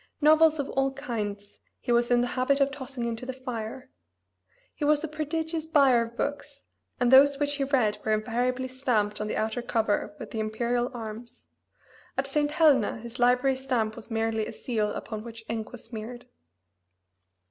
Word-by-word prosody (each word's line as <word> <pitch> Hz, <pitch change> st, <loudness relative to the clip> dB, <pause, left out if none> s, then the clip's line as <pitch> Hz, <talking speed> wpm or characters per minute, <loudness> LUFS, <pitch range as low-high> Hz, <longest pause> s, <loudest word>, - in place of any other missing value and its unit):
Novels 315 Hz, +1 st, +5 dB
of 285 Hz, -2 st, -2 dB
all 270 Hz, 0 st, +1 dB
kinds 210 Hz, -7 st, -5 dB, 0.2 s
he 245 Hz, -, -3 dB
was 240 Hz, 0 st, +3 dB
in 240 Hz, -1 st, +4 dB
the 245 Hz, -, 0 dB
habit 265 Hz, +2 st, +2 dB
of 275 Hz, 0 st, +3 dB
tossing 265 Hz, -3 st, -5 dB
into 230 Hz, 0 st, -3 dB
the 260 Hz, -, -3 dB
fire. 250 Hz, -2 st, -6 dB, 0.8 s
He -, -, -6 dB
was 295 Hz, +1 st, +3 dB
a -, -, -1 dB
prodigious 320 Hz, +1 st, -3 dB
buyer 275 Hz, -6 st, +5 dB
of 230 Hz, +1 st, -6 dB
books, 285 Hz, 0 st, -4 dB, 0.4 s
and 245 Hz, 0 st, +3 dB
those 275 Hz, +1 st, +7 dB
which 290 Hz, 0 st, 0 dB
he 275 Hz, -, 0 dB
read 230 Hz, -7 st, +1 dB
were 220 Hz, -, 0 dB
invariably 245 Hz, +4 st, 0 dB
stamped 245 Hz, -6 st, 0 dB
on 210 Hz, -, -2 dB
the -, -, -2 dB
outer 220 Hz, +3 st, -1 dB
cover 220 Hz, -3 st, 0 dB
with -, -, -9 dB
the 220 Hz, -, -3 dB
imperial 235 Hz, +3 st, 0 dB
arms; 230 Hz, -1 st, -8 dB, 0.7 s
at 265 Hz, -, +1 dB
St. 290 Hz, +2 st, 0 dB
Helena 295 Hz, -9 st, +3 dB
his 235 Hz, +2 st, -9 dB
library 250 Hz, +2 st, +3 dB
stamp 245 Hz, -5 st, -1 dB
was 220 Hz, -, -9 dB
merely 225 Hz, -1 st, -1 dB
a -, -, -7 dB
seal 215 Hz, -4 st, -1 dB
upon 215 Hz, 0 st, -5 dB
which 230 Hz, -1 st, -10 dB
ink 225 Hz, -1 st, -4 dB
was 245 Hz, -, -7 dB
smeared. 230 Hz, +1 st, -8 dB
245 Hz, 180 wpm, -27 LUFS, 225-275 Hz, 0.8 s, those